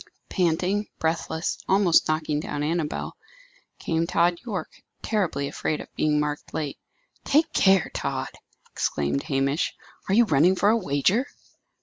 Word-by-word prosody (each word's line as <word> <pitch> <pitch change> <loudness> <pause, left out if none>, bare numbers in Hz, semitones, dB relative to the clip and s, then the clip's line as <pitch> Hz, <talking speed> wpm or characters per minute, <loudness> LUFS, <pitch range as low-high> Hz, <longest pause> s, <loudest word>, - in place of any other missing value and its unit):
Panting, 185 +3 0
breathless, 160 0 -2
almost 190 -3 +4
knocking 155 -1 0
down 145 -1 -3
Annabel, 155 0 -2 0.6
came 165 0 -1
Tod 175 0 +2
Yorke, 215 -6 -6 0.2
terribly 175 -10 0
afraid 150 +2 -2
of - - -10
being 150 -1 +2
marked 150 0 -3
late. 150 -3 -3 0.4
"Take 305 +3 +2
care, 190 -3 +4
Tod!" 135 -1 -3 0.4
exclaimed 70 -1 -1
Hamish. 140 +3 0 0.3
"Are 195 - +3
you 235 +1 +6
running 170 +1 +4
for 200 +2 +3
a 220 - +5
wager?" 190 - +1
160 Hz, 130 wpm, -25 LUFS, 150-190 Hz, 0.6 s, you